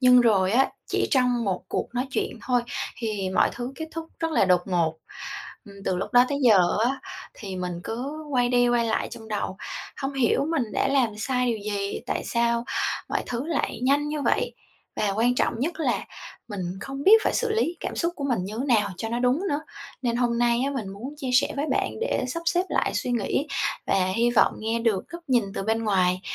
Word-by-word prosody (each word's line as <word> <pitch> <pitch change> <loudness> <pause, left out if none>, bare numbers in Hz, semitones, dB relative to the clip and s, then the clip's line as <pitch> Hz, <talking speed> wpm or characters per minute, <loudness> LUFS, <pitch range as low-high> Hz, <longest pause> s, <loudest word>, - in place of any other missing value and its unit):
Nhưng 250 -1 +7
rồi 200 -5 +3
á, 265 +3 +4 0.2
chỉ - - 0
trong 250 -4 +2
một 190 -2 -1
cuộc - - -1
nói 250 +2 0
chuyện 250 - -2
thôi, 245 -2 +2 0.3
thì 210 -5 -2
mọi - - +3
thứ 245 +2 -5
kết 320 - -4
thúc 330 -1 -5
rất 325 -1 0
là 250 - +4
đột 180 -1 +4
ngột. 170 -4 +1 0.7
Ừm, 200 - -12
từ 185 - 0
lúc 190 - -4
đó 245 0 +7
tới 280 - -1
giờ 185 -5 +5
á 260 +2 0 0.3
thì 195 -3 -6
mình 180 -1 -3
cứ 280 +7 -4
quay 245 -2 +3
đi 245 0 +4
quay 240 -1 +3
lại 220 - 0
trong 220 -1 -9
đầu, 205 -3 -2 0.5
hông 270 +1 -1
hiểu 265 +1 +2
mình 325 -5 +1
đã - - +1
làm 255 -6 +2
sai 250 +2 0
điều 230 -2 0 0.2
gì, 200 0 -2
tại - - -2
sao 235 0 +1 0.4
mọi - - 0
thứ 245 +3 -3
lại 330 -6 -1
nhanh 285 +3 +2
như 300 -1 -2
vậy? - - +1 0.4
Và 205 - +1
quan 245 +3 +3
trọng - - +1
nhất 320 +3 -2
là - - 0 0.4
mình 205 -3 -5 0.2
không 275 +1 -5
biết 440 +2 +8
phải - - +2
xử 475 -2 +1
lý 355 -6 0
cảm - - -4
xúc 340 0 0
của 280 - -4
mình 245 -9 0
như 210 +4 -5
nào 210 -5 +3
cho 225 - -3
nó 235 +1 -1
đúng 250 +5 +2
nữa. 290 -2 0 0.4
Nên 235 -1 0
hôm 240 -1 +1
nay 240 0 +3
á, 280 - 0
mình 235 -8 -3
muốn 230 +9 -7
chia 270 -4 -4
sẻ 255 - +4
với 285 - 0
bạn - - +1
để 475 - 0
sắp 335 +6 -3
xếp 350 +2 +3
lại - - +1
suy - - -1
nghĩ 240 +5 0 0.4
và 185 -1 +2
hy 235 +2 +3
vọng 240 - +4
nghe 225 +1 -1
được 225 -5 0
góc 340 0 -8
nhìn 245 -4 +3
từ - - -2
bên 225 +2 0
ngoài, 185 -3 +2
240 Hz, 225 wpm, -25 LUFS, 215-275 Hz, 0.7 s, biết